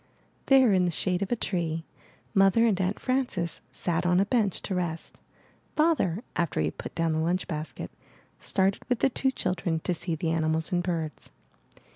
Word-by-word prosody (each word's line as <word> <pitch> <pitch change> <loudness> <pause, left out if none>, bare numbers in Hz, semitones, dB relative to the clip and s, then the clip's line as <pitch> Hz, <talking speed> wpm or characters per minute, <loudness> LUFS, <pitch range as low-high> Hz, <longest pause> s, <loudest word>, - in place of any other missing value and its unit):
There 265 -5 +6
in 185 -1 +4
the - - +2
shade 180 +2 0
of 200 - -2
a - - +3
tree. 165 -6 -2 0.5
Mother 195 +3 +5
and 200 -5 +2
Aunt 190 +2 -1
Frances 245 -11 -1
sat 175 -1 -1
on 180 0 +3
a 195 - +3
bench 210 -4 0
to 195 - -3
rest. 175 -3 -3 0.6
Father, 300 - +2
after 170 - 0
he 80 - +2
had 75 - -4
put - - -7
down 165 -1 +1
the 160 - 0
lunch 175 +3 0
basket, 155 -2 -5 0.5
started 195 0 +1
with 250 - +2
the 270 - +2
two 265 - +1
children 175 -9 -1
to 180 - 0
see 170 0 -2
the 160 +1 -1
animals 160 +1 0
and 175 -1 +2
birds. 165 -3 -3
180 Hz, 185 wpm, -28 LUFS, 165-205 Hz, 0.6 s, There